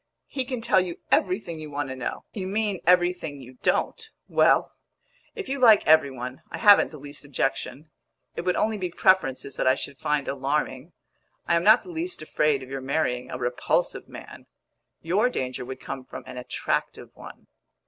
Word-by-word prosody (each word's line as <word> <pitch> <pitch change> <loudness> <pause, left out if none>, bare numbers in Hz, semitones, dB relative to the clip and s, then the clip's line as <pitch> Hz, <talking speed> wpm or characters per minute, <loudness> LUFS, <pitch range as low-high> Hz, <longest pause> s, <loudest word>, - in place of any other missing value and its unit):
He 265 -2 -3
can 250 -2 -4
tell 205 -4 +4
you 180 -2 -5
everything 180 -3 +1
you 155 -1 -7
want 145 -1 -3
to 130 - -5
know." 130 - -5
"You 190 -4 -4
mean 205 -1 -1
everything 175 -4 +2
you 130 -1 -13
don't! 460 - 0 0.2
Well, - - +3 0.6
if 420 -3 -6
you 275 +1 -2
like 225 -5 +6
every 155 -2 +5
one, 125 0 -7
I - - -6
haven't 205 -3 +6
the 155 - -11
least 145 +1 -10
objection. 140 +1 -3 0.4
It - - -3
would 180 +1 0
only 220 0 0
be 180 -1 -2
preferences 165 -8 +1
that - - 0
I 130 - +5
should 135 0 -7
find 150 -1 0
alarming. 140 +2 -2 0.5
I - - +2
am 170 0 +2
not 215 +5 +6
the - - -12
least 340 - -5
afraid 150 -3 +1
of 130 - -11
your 135 -1 -4
marrying 130 -2 -1
a - - -5
repulsive 125 0 -1
man; - - -11 0.6
your 200 +9 +2
danger 130 - -3
would 130 +1 -7
come 130 - -6
from - - -9
an 130 - -9
attractive 125 - -3
one." - - -12
155 Hz, 185 wpm, -25 LUFS, 130-190 Hz, 0.6 s, like